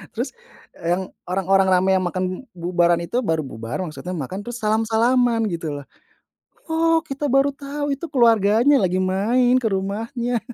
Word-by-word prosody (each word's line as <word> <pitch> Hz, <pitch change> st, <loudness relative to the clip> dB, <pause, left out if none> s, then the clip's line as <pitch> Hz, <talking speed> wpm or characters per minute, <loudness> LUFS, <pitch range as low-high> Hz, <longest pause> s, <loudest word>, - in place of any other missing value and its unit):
Terus 245 Hz, +4 st, -3 dB, 0.4 s
e -, -, -19 dB
yang 180 Hz, +2 st, +1 dB, 0.3 s
orang-orang 195 Hz, +1 st, +2 dB
rame, 185 Hz, +1 st, +3 dB
yang 185 Hz, -1 st, +1 dB
makan 185 Hz, +1 st, -2 dB, 0.3 s
bubaran 175 Hz, 0 st, +2 dB
itu, 235 Hz, +9 st, -1 dB
baru 160 Hz, -8 st, -1 dB
bubar, 115 Hz, +2 st, -6 dB
maksudnya 175 Hz, +3 st, -6 dB
makan 165 Hz, +7 st, -5 dB
terus 240 Hz, +2 st, -6 dB
salam-salaman 225 Hz, +2 st, +2 dB
gitu 165 Hz, -2 st, -4 dB
loh. 140 Hz, -, -9 dB, 0.9 s
Oh, 325 Hz, 0 st, +2 dB
kita 290 Hz, -1 st, -3 dB
baru 275 Hz, +1 st, +3 dB
tahu, 285 Hz, +1 st, -4 dB
itu 280 Hz, -, -7 dB
keluarganya 235 Hz, +1 st, +4 dB
lagi 185 Hz, -2 st, +1 dB
main 235 Hz, +7 st, +2 dB
ke 240 Hz, -, -1 dB
rumahnya. 225 Hz, +5 st, -2 dB
220 Hz, 155 wpm, -22 LUFS, 185-255 Hz, 0.9 s, keluarganya